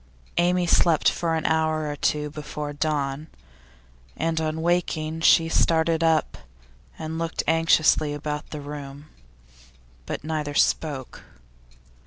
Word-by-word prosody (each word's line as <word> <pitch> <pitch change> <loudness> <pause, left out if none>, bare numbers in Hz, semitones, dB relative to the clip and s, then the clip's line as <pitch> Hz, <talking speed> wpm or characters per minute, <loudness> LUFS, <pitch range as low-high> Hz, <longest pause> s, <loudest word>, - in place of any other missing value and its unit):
Amy 175 +1 +2
slept 170 -2 +3
for 165 -1 -1
an 160 - -3
hour 160 -1 +1
or 145 - -3
two 150 0 -1
before 150 -1 -6
dawn, 145 -1 -2 0.9
and 160 0 -1
on 155 0 -2
waking 165 -2 -1
she 165 0 +5
started 165 0 +2
up 160 -1 +1 0.6
and 160 +1 -5
looked 165 -1 -2
anxiously 160 -2 +3
about 150 0 -5
the 150 - -6
room. 145 0 -8 1.0
But - - -4
neither 150 -2 -3
spoke. 140 -5 0
155 Hz, 120 wpm, -24 LUFS, 150-165 Hz, 1.0 s, she